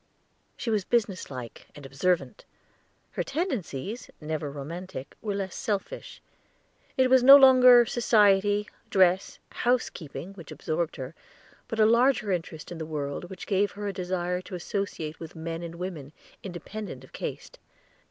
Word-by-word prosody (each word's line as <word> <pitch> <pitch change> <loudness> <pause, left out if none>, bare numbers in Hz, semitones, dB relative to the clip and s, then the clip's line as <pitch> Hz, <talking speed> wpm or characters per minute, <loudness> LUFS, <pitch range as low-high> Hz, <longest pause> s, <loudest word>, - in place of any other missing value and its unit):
She 235 - -2
was 210 -3 +1
business 210 -4 0
like 125 -4 -8
and 145 - -11
observant. 175 - -1 0.7
Her - - -2
tendencies, 240 - -3
never 155 -1 -3
romantic, 145 +1 -7
were 205 -2 -2
less 195 -2 -3
selfish; 215 - -4 0.7
it 260 -1 +5
was 260 0 +5
no 275 +3 +11
longer 255 -3 +8
society, 205 -3 +3 0.2
dress, 185 0 +3
housekeeping, 195 - -2
which 170 -6 -12
absorbed 165 +1 -2
her, 130 +1 -6 0.5
but 225 - -4
a 215 - +7
larger 235 -1 +3
interest 165 -3 -4
in 170 - -6
the 160 - -4
world 145 0 -4
which 190 - -8
gave 200 0 +1
her 205 0 -5
a 200 - -2
desire 180 -1 -2
to 185 - -8
associate 175 -4 -4
with 165 0 -9
men 165 +1 -5
and 170 -1 -7
women, 170 -5 -6 0.3
independent 185 -4 -7
of 130 - -17
caste. - - -6
185 Hz, 145 wpm, -27 LUFS, 160-215 Hz, 0.7 s, no